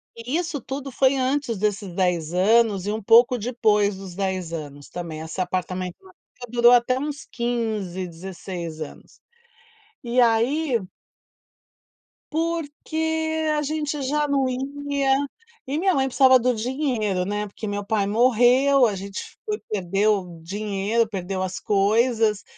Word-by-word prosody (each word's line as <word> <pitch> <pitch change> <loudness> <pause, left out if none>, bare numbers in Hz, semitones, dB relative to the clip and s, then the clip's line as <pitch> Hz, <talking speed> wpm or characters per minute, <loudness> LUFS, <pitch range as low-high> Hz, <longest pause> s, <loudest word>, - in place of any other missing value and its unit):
E 245 +7 -3
isso 335 -5 -3
tudo 270 +3 -6
foi 265 +2 +3
antes 260 -3 0
desses 205 -1 -1
10 175 -3 0
anos, 205 +1 +3
e 205 - -1
um 220 +1 -3
pouco 240 +4 +6
depois 210 -3 +1
dos 190 -2 -9
10 185 -3 -2
anos 145 -3 -7
também, 165 -3 -6
essa 160 +4 -4
apartamento 185 0 -3
na 375 -1 -17
praia 245 -8 -14
durou 240 0 +6
até 245 +1 +4
uns 290 -1 -5
15, 220 -7 -2
16 175 -1 -7
anos. 150 - -10 0.8
E 245 +1 +1
aí. 240 +4 +2 1.5
Porque 320 0 -2
a - - +1
gente 300 -1 -2
já 295 +3 0
não 275 -2 +1
ia, 275 +1 0 0.5
e 285 +3 -1
minha 375 +2 +2
mãe 270 -1 +1
precisava 260 0 +5
do 250 +1 +2
dinheiro, 220 -6 -1
né, 205 +2 -2
porque 210 +2 -7
meu 205 0 -3
pai 215 -2 +1
morreu, 250 +4 +4
a 210 -3 0
gente 195 +1 -7
foi 420 -1 -2
perdeu 195 -2 0
dinheiro, 205 +4 -1
perdeu 190 -2 -4
as 185 0 -4
coisas, 215 +1 +2
230 Hz, 140 wpm, -23 LUFS, 195-270 Hz, 1.5 s, pouco